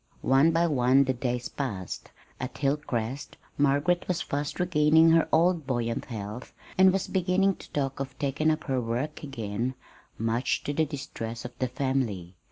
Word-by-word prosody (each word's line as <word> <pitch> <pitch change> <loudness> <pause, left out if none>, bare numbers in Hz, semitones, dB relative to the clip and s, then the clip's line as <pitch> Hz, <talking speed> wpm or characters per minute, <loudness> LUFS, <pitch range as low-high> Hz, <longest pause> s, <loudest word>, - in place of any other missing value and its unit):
One 135 +4 +5
by 165 +1 +3
one 135 -3 +4
the 130 -1 0
days 125 -1 -2
passed. 105 -10 -5 0.3
At 130 - -5
Hilcrest 135 -2 -2 0.2
Margaret 145 +5 +2
was 180 -2 0
fast 145 +1 -3
regaining 160 -2 +5
her 165 -1 +4
old 165 -2 +3
buoyant 120 -3 -1
health, 110 0 -7 0.2
and 190 0 +6
was 190 0 -1
beginning 190 +1 +2
to - - -13
talk 135 -2 -2
of 135 -1 -5
taking 145 +3 0
up 155 0 0
her 130 -3 0
"work" 120 +6 -3
again, 120 -2 -3 0.4
much 115 +3 0
to 145 - -2
the 160 +2 +2
distress 120 -6 -6
of 120 - -5
the 130 - +1
family. 125 -9 -2
135 Hz, 165 wpm, -27 LUFS, 120-155 Hz, 0.4 s, and